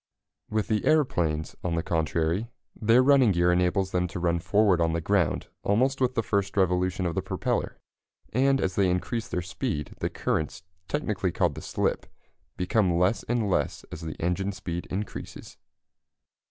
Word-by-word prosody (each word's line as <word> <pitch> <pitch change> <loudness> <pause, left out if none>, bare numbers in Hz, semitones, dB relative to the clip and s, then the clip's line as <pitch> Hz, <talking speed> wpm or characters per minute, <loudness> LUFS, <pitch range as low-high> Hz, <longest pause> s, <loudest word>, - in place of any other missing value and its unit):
With 110 -1 -1
the 110 -1 0
aeroplanes, 85 - +1
on 85 -2 -1
the 85 - -1
contrary, 80 +6 0 0.3
their 115 +4 +4
running 130 -6 +5
gear 85 0 +3
enables 90 +2 +1
them 90 0 +1
to 90 - -6
run 85 0 +1
forward 100 0 +3
on 80 -1 +2
the 85 - 0
ground 90 -3 +1 0.2
almost 130 +6 +1
with 125 0 +1
the 115 - +1
first 100 -1 -1
revolution 90 0 +1
of 85 - -1
the - - -1
propeller, - - -2 0.6
and 135 +3 +3
as 95 -5 0
they 95 -2 +3
increase 110 +6 -1
their 90 - -2
speed 95 - -3
the - - -1
currents 80 +4 -2 0.2
technically 110 - -1
called - - +1
the - - -8
"slip" - - -1 0.5
become 90 -1 +2
less 90 +6 +2
and 120 -3 +1
less 75 -8 -1
as 80 - -7
the 80 -2 -6
engine 90 +3 0
speed 85 -3 -5
increases. 100 +3 -6
95 Hz, 165 wpm, -27 LUFS, 85-110 Hz, 0.6 s, running